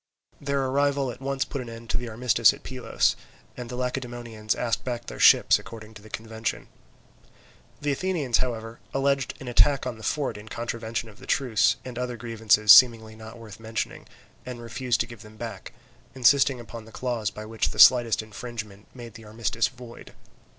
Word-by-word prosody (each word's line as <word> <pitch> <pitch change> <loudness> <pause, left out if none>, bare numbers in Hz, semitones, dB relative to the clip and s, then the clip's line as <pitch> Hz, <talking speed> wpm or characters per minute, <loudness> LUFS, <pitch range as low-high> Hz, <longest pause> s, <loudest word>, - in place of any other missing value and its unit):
Their 140 -1 -1
arrival 140 0 +1
at 120 - -12
once 135 0 -1
put 140 - -5
an 120 - -8
end 115 0 -8
to - - 0
the 120 -1 -5
armistice 115 0 +3
at - - -18
Pylos, 125 -3 0 0.4
and 125 -1 -7
the 125 - -5
Lacedaemonians 120 -4 -3
asked 115 -3 -1
back 120 -2 -4
their - - -8
ships - - +6
according 110 -1 -11
to 105 - -13
the 110 - -15
convention. 110 +1 -5 1.1
The 145 0 0
Athenians, 150 -5 0
however, 115 -2 -4 0.2
alleged 135 -1 0
an 135 - -9
attack 135 +3 +3
on 125 -3 -4
the - - -12
fort 145 -4 -1
in 110 +1 -12
contravention 115 0 -4
of 110 0 -15
the 135 - -13
truce, 115 -4 +2
and 125 -1 -6
other 125 -1 -3
grievances 110 -2 +3
seemingly 110 -2 +7
not 110 +1 -11
worth 115 -3 -12
mentioning, 110 0 -5 0.4
and 125 -1 -7
refused 120 +1 -1
to - - 0
give 115 -3 -12
them 110 0 -14
back, 115 0 -7 0.4
insisting 135 +1 +4
upon 115 -1 -9
the 115 - -14
clause 120 -5 -2
by 105 0 -9
which 110 0 -1
the - - -9
slightest 120 -4 +6
infringement 110 -2 -8
made 120 -3 -10
the 115 0 -12
armistice 115 +2 -1
void. 125 -2 -12
120 Hz, 185 wpm, -26 LUFS, 110-125 Hz, 1.1 s, seemingly